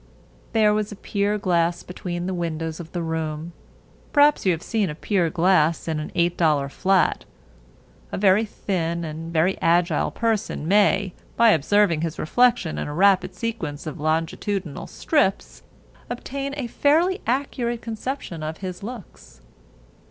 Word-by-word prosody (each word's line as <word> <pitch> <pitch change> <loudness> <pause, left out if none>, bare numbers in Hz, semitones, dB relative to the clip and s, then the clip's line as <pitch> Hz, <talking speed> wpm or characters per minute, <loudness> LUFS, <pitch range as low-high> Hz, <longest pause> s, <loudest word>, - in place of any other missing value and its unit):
There 215 -2 +4
was 210 0 -1
a - - -6
pier 205 +1 -1
glass 175 -3 +1
between 175 -1 -5
the 190 - -2
windows 165 -2 -3
of 170 -1 -9
the 175 -2 -3
room. 160 0 -3 0.6
Perhaps 290 -7 +4
you - - +5
have 165 -1 -3
seen 215 -5 0
a 150 - -5
pier 180 0 0
glass 170 -2 +2
in 160 -2 -1
an 155 - -6
$8 160 -5 +2
flat. 190 +4 +2 0.9
A - - -3
very 195 +2 +4
thin 170 -5 -2
and 160 +1 -6
very 170 +3 +1
agile 170 -1 +2
person 220 -8 -1
may, 200 -1 +3 0.2
by 230 0 +6
observing 170 0 +3
his 165 -1 -3
reflection 240 -2 +2
in - - -3
a 145 - -5
rapid 195 +1 +3
sequence 175 -12 -4
of 155 +1 -6
longitudinal 160 +2 -2
strips, 285 -12 0 0.5
obtain 275 +3 -4
a 275 - -2
fairly 325 - +2
accurate 240 -2 -1
conception 225 - -5
of 155 +1 -4
his 185 -2 -6
looks. 200 - -10
185 Hz, 145 wpm, -23 LUFS, 165-215 Hz, 0.9 s, by